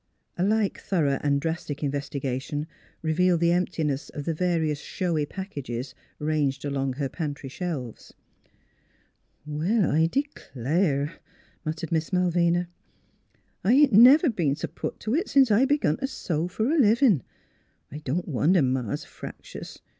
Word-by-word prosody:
A 175 - -1
like 210 0 +1
thorough 150 -8 0
and 140 -1 +2
drastic 160 -1 -4
investigation 140 0 -3 0.4
revealed 170 +2 +2
the 170 0 +3
emptiness 160 -5 -1
of 145 - -7
the 165 - 0
various 160 -3 0
showy 160 -3 -2
packages 140 -10 -6 0.2
ranged 150 -2 -1
along 135 -2 -1
her 140 +1 -2
pantry 145 -2 -5
shelves. 140 - -5 1.3
"Well, 165 +7 +1
I 160 +2 +3
d'clare," 155 - -1 0.4
muttered 155 0 -4
Miss 160 -1 0
Malvina> 175 -1 +2 0.5
" - - -42
I 215 - +4
ain't 285 -1 +5
never 260 - +8
been 165 -10 0
s' - - -4
put - - -5
to 215 - -2
it 345 +8 0
since 270 -4 +5
I 225 +6 +5
begun 285 - +1
to 270 - -2
sew 170 - -2
f'r 220 - 0
a - - +2
livin'. 225 - +4 0.7
I 150 - -6
don't 155 +4 -2
wonder 160 +3 +3
Ma's 125 -4 -1
fractious. - - -10
160 Hz, 140 wpm, -26 LUFS, 145-190 Hz, 1.3 s, never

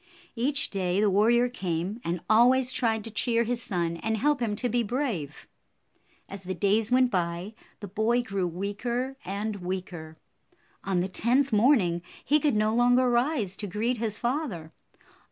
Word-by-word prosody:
Each 270 +4 0
day 185 -1 0
the 210 -1 +3
warrior 235 +5 +4
came, 190 -2 -3
and 170 0 -3
always 250 +4 +4
tried 225 -4 0
to 225 - -7
cheer 230 +2 +1
his 240 +1 -1
son 170 -5 -2
and 220 +5 -2
help 290 +4 +1
him 225 -4 -1
to 245 - -2
be 240 +1 +1
brave. 220 - -3 0.8
As 195 -1 -8
the 185 0 -5
days 210 +4 +1
went 250 0 +3
by, 175 +2 -2 0.3
the 205 - -6
boy 220 +5 +1
grew 195 -5 -2
weaker 225 +9 -3
and 205 +3 -3
56 200 - -9
weaker. 175 -4 -6 0.7
On 190 -2 0
the 185 - -1
tenth 245 +7 +1
morning, 210 -7 +3 0.2
he 300 +2 +3
could 290 -5 +1
no 215 +1 +2
longer 245 +1 +3
rise 240 - 0
to 205 - -5
greet 225 +6 -1
his 220 -2 -2
father. 235 - -3
215 Hz, 170 wpm, -27 LUFS, 190-245 Hz, 0.8 s, warrior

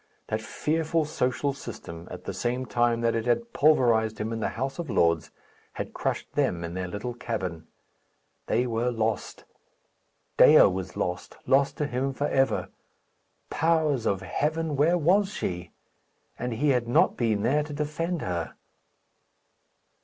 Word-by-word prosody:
That 110 0 -1
fearful 160 +7 0
social 140 0 -1
system, 90 -10 -9
at 90 0 -8
the 100 - -5
same 125 +6 -2
time 120 -1 +1
that 115 0 +2
it 115 +1 -2
had 235 - 0
pulverized 120 -7 +3
him 110 +2 -2
in 115 - -3
the - - -1
House 135 +6 -3
of 165 -5 -4
Lords, 85 -7 +2 0.4
had - - -5
crushed - - -3
them 85 -1 0
in 85 0 -5
their 90 0 -3
little 105 +7 -4
cabin. 95 -9 -4 0.8
They 120 +3 +2
were 120 0 0
lost; 110 -3 -2 0.9
Dea - - +8
was 95 -1 0
lost 90 0 -3
lost 140 +1 +3
to 150 - 0
him 135 0 -2
for 145 - -2
ever. 135 -2 +1 0.8
Powers 160 -6 +1
of 95 -2 0
heaven! 155 +1 -1
where 160 +6 +3
was 190 +5 +3
she? 90 - -4 0.7
And 125 0 -2
he 145 +6 +1
had 125 -3 +2
not 120 - +3
been 110 -4 0
there 150 +4 +3
to 150 0 -6
defend 155 +4 -2
her! 85 -2 -3
120 Hz, 155 wpm, -27 LUFS, 110-150 Hz, 0.9 s, Dea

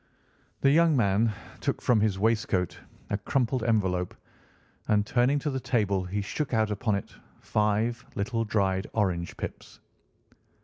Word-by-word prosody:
The 135 - +5
young 165 -1 +4
man 110 0 +3 0.3
took - - -1
from 120 -3 +3
his 105 -2 +1
waistcoat 105 -4 0 0.3
a 100 - 0
crumpled 125 +3 0
envelope, 95 -6 +1 0.7
and 105 -1 +3
turning 125 +5 +2
to 145 +1 -2
the 130 - -2
table 100 -7 0
he 100 +3 -2
shook 135 +5 -2
out 110 -1 +2
upon 105 0 0
it 100 - -5 0.3
five 110 +3 0
little 115 +3 -1
dried 95 -3 0
orange 90 -5 0
pips. - - -7
110 Hz, 140 wpm, -28 LUFS, 100-120 Hz, 0.7 s, The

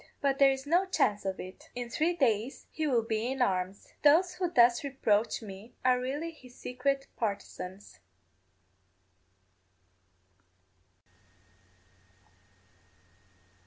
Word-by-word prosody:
But 275 -1 +1
there 275 -1 +7
is 270 0 -2
no 350 +6 +2
chance 210 - +1
of 190 -1 -2
it; 185 +1 -10
in 245 -1 -4
three 315 +8 +1
days 245 -5 0
he 315 -1 -2
will 240 -5 +2
be 225 +2 -1
in 265 - -4
arms. 190 -4 -1
Those 335 +5 +5
who 360 -1 -1
thus 240 -6 +5
reproach 230 -6 +1
me 200 +2 -10
are 250 -1 +4
really 290 +6 -3
his 255 -6 -16
secret 275 +2 -1
partisans. 200 - -5
250 Hz, 110 wpm, -30 LUFS, 215-285 Hz, -, there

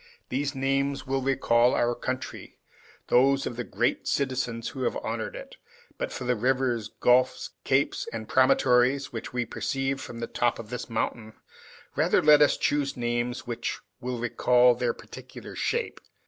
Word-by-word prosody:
These 140 +2 -2
names 135 +1 0
will 135 0 -1
recall 125 -2 +3
our 120 0 +2
country, 130 +2 -5 0.5
and - - +1
those 135 +1 +3
of 120 - -4
the 125 - -3
great - - -1
citizens 125 -4 -1
who 135 - -7
have - - 0
honored - - -4
it; - - -10 0.4
but - - -2
for - - -5
the 125 0 +1
rivers, 125 -1 0
gulfs, 125 +3 +2
capes, 135 +1 +1
and 110 -1 -6
promontories, 130 +1 +3
which 115 - -5
we 125 -1 -1
perceive 135 +3 -2
from 120 -2 -8
the 115 - -2
top 120 0 0
of 115 0 -9
this 125 - -5
mountain, 110 -1 -3 0.6
rather - - +3
let 150 0 +6
us 145 - +5
choose 145 -2 0
names 120 +1 -2
which 120 -1 -3 0.2
will 125 -1 -4
recall 125 +1 +4
their 120 0 -1
particular - - -11
shape. - - -2
125 Hz, 160 wpm, -27 LUFS, 120-135 Hz, 0.6 s, let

